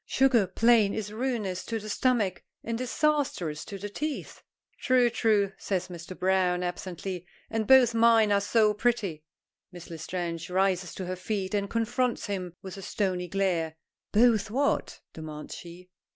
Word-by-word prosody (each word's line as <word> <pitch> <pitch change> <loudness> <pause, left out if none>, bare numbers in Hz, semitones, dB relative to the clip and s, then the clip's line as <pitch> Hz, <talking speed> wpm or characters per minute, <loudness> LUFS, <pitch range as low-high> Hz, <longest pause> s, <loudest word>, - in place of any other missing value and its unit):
Sugar, 255 -7 +3
plain, 220 +1 +4
is 210 -1 -4
ruinous 220 -6 -2
to 230 - -2
the 215 -1 -7
stomach 215 -4 +1 0.2
and 230 - -2
disastrous 255 - 0
to 200 - -7
the 200 +2 -5
teeth." 295 +8 -5 0.4
"True, 250 -2 +3
true," 210 -4 +2
says 185 -2 -2
Mr. 175 +1 -8
Browne, 180 -1 +2
absently, 180 0 -5 0.2
"and 220 -1 -1
both 255 -2 +7
mine 225 -2 +5
are 200 0 +3
so 210 +1 +3
pretty." 210 -8 -1 0.5
Miss 175 -1 -11
L'Estrange 165 0 -4
rises 185 -1 0
to 185 - -5
her 185 +1 -3
feet 190 +1 -3
and 200 -1 0
confronts 235 +2 0
him 185 -4 -4
with 190 0 -7
a - - -7
stony 185 -2 -2
glare. 175 -4 0 0.4
"Both 220 -1 +4
what?" 275 +6 0
demands 155 -1 -8
she. 180 +1 -11
200 Hz, 150 wpm, -28 LUFS, 180-230 Hz, 0.5 s, both